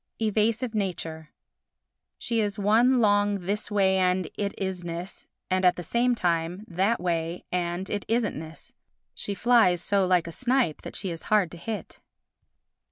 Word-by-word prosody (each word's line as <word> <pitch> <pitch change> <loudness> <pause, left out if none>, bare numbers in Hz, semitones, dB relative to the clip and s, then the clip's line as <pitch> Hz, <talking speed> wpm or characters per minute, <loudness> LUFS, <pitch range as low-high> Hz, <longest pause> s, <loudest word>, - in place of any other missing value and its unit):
Evasive 220 +2 +1
Nature 165 -6 -3 0.9
She 230 -1 -1
is 205 -2 -2
one 230 +5 +4
long 205 -2 +3
This 205 +4 -2
way 190 -2 +3
and 185 -2 +1
it 200 -1 -3
isness 180 -2 -5 0.2
and, 185 0 +2
at 180 -1 +5
the 175 - -6
same 240 +7 +1
time, 175 +1 -1
That 190 +6 +1
way 170 -1 -2
and 180 +1 -2
it 205 -1 -3
isn'tness. 200 -9 -3 0.4
She 200 - -5
flies 225 -5 +4
so 195 -1 +2
like 180 -2 +3
a 170 - -6
snipe 250 - +1
that - - -8
she 190 - -2
is 165 -1 -7
hard 205 -6 +3
to 175 - -9
hit. 215 +5 -6
190 Hz, 155 wpm, -26 LUFS, 175-215 Hz, 0.9 s, at